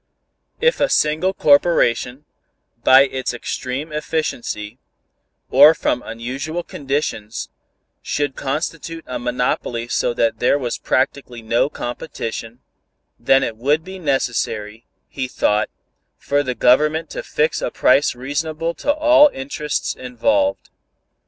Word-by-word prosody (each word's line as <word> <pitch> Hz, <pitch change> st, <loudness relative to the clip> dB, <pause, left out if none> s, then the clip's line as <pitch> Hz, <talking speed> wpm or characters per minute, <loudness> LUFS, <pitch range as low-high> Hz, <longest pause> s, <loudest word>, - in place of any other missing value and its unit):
If 485 Hz, +1 st, +2 dB
a 285 Hz, -, +2 dB
single 155 Hz, +5 st, +2 dB
corporation, 145 Hz, -5 st, +2 dB, 0.6 s
by 130 Hz, +1 st, +8 dB
its 130 Hz, -2 st, -3 dB
extreme 130 Hz, +5 st, -4 dB
efficiency, 130 Hz, -7 st, -3 dB, 0.7 s
or 145 Hz, +5 st, +8 dB
from 125 Hz, -, -1 dB
unusual 135 Hz, +9 st, -5 dB
conditions, 135 Hz, -8 st, -3 dB, 0.5 s
should 145 Hz, -2 st, -2 dB
constitute 165 Hz, +4 st, -4 dB
a 125 Hz, -, -5 dB
monopoly 120 Hz, -1 st, -2 dB
so 120 Hz, -, 0 dB
that 115 Hz, -1 st, +1 dB
there 125 Hz, +3 st, +3 dB
was 125 Hz, -4 st, -3 dB
practically 130 Hz, -3 st, -1 dB
no 115 Hz, +5 st, +1 dB
competition, 120 Hz, -3 st, -6 dB, 0.6 s
then 135 Hz, 0 st, +4 dB
it 115 Hz, -3 st, -3 dB
would 145 Hz, +7 st, +1 dB
be 190 Hz, +1 st, -9 dB
necessary, 120 Hz, -, -2 dB, 0.2 s
he 130 Hz, -2 st, -4 dB
thought, 105 Hz, -4 st, +1 dB, 0.5 s
for 145 Hz, 0 st, 0 dB
the 130 Hz, -3 st, -3 dB
Government 150 Hz, +7 st, +3 dB
to -, -, -4 dB
fix 155 Hz, +1 st, 0 dB
a -, -, -1 dB
price 135 Hz, +1 st, +3 dB
reasonable 155 Hz, +6 st, -3 dB
to 290 Hz, -, 0 dB
all 305 Hz, 0 st, +6 dB
interests 145 Hz, +2 st, -3 dB
involved. 280 Hz, -, -1 dB
135 Hz, 120 wpm, -20 LUFS, 120-155 Hz, 0.7 s, by